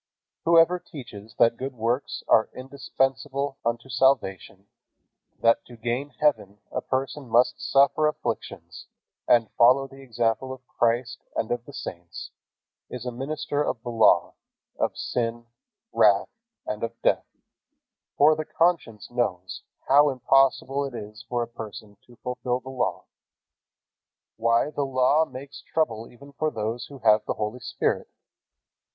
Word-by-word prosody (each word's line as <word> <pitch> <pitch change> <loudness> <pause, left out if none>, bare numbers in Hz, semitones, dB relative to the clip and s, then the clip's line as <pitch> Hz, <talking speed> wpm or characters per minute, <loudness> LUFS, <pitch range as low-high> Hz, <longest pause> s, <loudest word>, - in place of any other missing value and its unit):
Whoever 170 +2 +5
teaches 115 - -11
that 115 0 +4
good 135 0 -5
works 120 +4 -2
are 110 - +4
indispensable 135 +1 -2
unto 115 +2 -2
salvation, 125 -7 +1 0.7
that 115 0 +3
to 120 - -13
gain 120 +5 -2
heaven 125 -9 +1
a - - -2
person 135 0 -3
must 120 +2 +3
suffer 140 +2 +3
afflictions 150 - -5 0.4
and 115 -2 +4
follow 130 +3 +6
the 135 0 -14
example 120 0 -1
of 130 -1 -13
Christ 120 +1 0 0.2
and 110 - -1
of 120 0 -2
the - - -11
saints, 85 -9 -7 0.6
is 125 0 -7
a 125 - -2
minister 145 +3 -3
of 120 -5 -3
the 120 - -4
Law, 115 -2 +4 0.5
of - - 0
sin, 115 -1 -2 0.5
wrath, 100 -2 +4 0.4
and 105 - -4
of 115 - -4
death, - - +2 0.9
for 155 +2 +6
the 155 - -3
conscience 165 -14 0
knows 95 -7 -2 0.3
how 145 +2 +6
impossible 135 +1 +2
it 135 -3 -5
is 105 -1 -8
for 120 -1 0
a - - -6
person 110 -2 -9
to 120 - -17
fulfill 125 0 -2
the 130 - -10
Law. 130 -2 -2 1.3
Why, 115 +5 +2
the 145 - -3
Law 135 +3 +3
makes 135 +2 -10
trouble 115 -8 -1
even 140 +4 -15
for 155 +2 0
those 115 -1 -4
who 140 - -11
have 105 0 +6
the - - -1
Holy 105 +3 -3
Spirit. 130 - -1
125 Hz, 140 wpm, -25 LUFS, 115-135 Hz, 1.3 s, follow